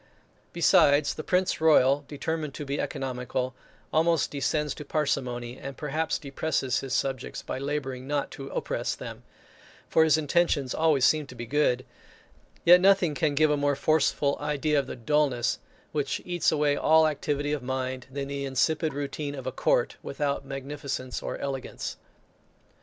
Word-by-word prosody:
Besides, 145 +1 +4
the 155 - -6
Prince 180 -1 +1
Royal, 145 -3 +5
determined 150 0 -3
to 150 - -5
be 140 +1 -2
economical, 125 -1 -3 0.4
almost 165 -1 +2
descends 150 +1 -1
to - - -8
parsimony; 125 -5 -2
and 140 -1 -7
perhaps 155 +2 -1
depresses 135 -2 -1
his 135 -1 -3
subjects, 135 -2 -2
by - - -4
labouring 135 -2 -3
not 145 -1 -1
to 135 - -8
oppress - - -2
them; - - -8 0.7
for 160 - +4
his 160 -1 +4
intentions 150 -3 +1
always 155 -5 +3
seem 155 -2 +3
to 130 - -11
be 120 - -6
good 130 -1 +1 0.8
yet 180 +1 +8
nothing 190 -4 +4
can 150 -1 0
give 155 +1 +4
a 150 - +2
more 145 0 +1
forcible 145 -1 +1
idea 150 0 +1
of 135 - -3
the - - -5
dulness 130 -1 +1 0.3
which 145 -2 -1
eats 175 -1 +1
away 150 -2 +2
all 160 +2 +5
activity 145 -1 -1
of 150 -2 -1
mind, 130 0 -3
than 140 +1 -4
the 140 0 -4
insipid 150 +3 0
routine 145 0 -4
of 135 -2 -7
a 130 - -2
court, 120 -1 +1
without 140 0 -2
magnificence 135 -1 -5
or - - -4
elegance. 135 -2 -5
145 Hz, 160 wpm, -27 LUFS, 135-155 Hz, 0.8 s, yet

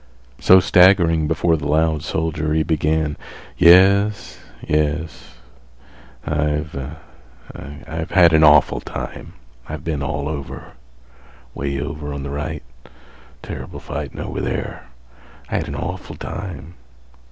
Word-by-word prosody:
So, 95 - +7
staggering 90 -4 +4
before 80 +1 +1
the 75 -1 -4
loud 80 0 +1
soldier, 80 -1 -2
he 80 - +2
began: 80 -1 0 0.4
"Yes, 100 +4 +4 0.3
yes. 75 -3 -2 0.9
I've—I've 75 0 -5
had 85 -3 +5
an 80 0 +5
awful 75 -2 +5
time. - - -7 0.4
I've 75 +1 -6
been 80 -4 -3
all 70 +1 -3
over. 75 -3 -6 0.8
Way 70 -1 -3
over 75 +1 -5
on 70 - -5
th' 70 - -5
right. 75 +1 -4 0.8
Ter'ble - - -7
fightin' 75 -1 -6
over - - -4
there. - - -4 0.6
I - - +1
had - - -3
an - - -5
awful - - -5
time. 85 -4 -7
75 Hz, 115 wpm, -20 LUFS, 75-80 Hz, 0.9 s, So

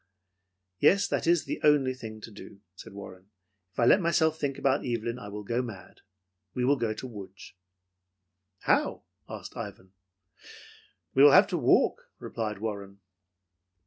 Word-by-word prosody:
"Yes, 200 +2 +4
that - - -1
is 170 -1 +3
the - - -4
only 145 -4 +4
thing 110 -4 -9
to 115 - -10
do," 100 -1 -13
said 90 - -12
Warren. 95 -1 -11 0.4
"If - - -10
I 120 - +4
let 190 - +6
myself 160 -2 +2
think 140 -3 -2
about 135 0 +1
Evelyn, 120 0 -3
I 105 - -9
will 105 +1 -7
go 120 +4 -1
mad. 115 -7 -10 0.5
We 125 - 0
will 140 +3 +4
go 115 -4 -1
to 130 - -7
Lodz." 100 -5 -11 1.1
"How?" - - +1 0.3
asked - - -8
Ivan. 95 0 -8 1.2
"We 135 - +4
will 145 -1 +8
have - - +8
to - - -1
walk," - - +2
replied 105 -2 -4
Warren. 100 -2 -6
115 Hz, 155 wpm, -28 LUFS, 105-135 Hz, 1.2 s, will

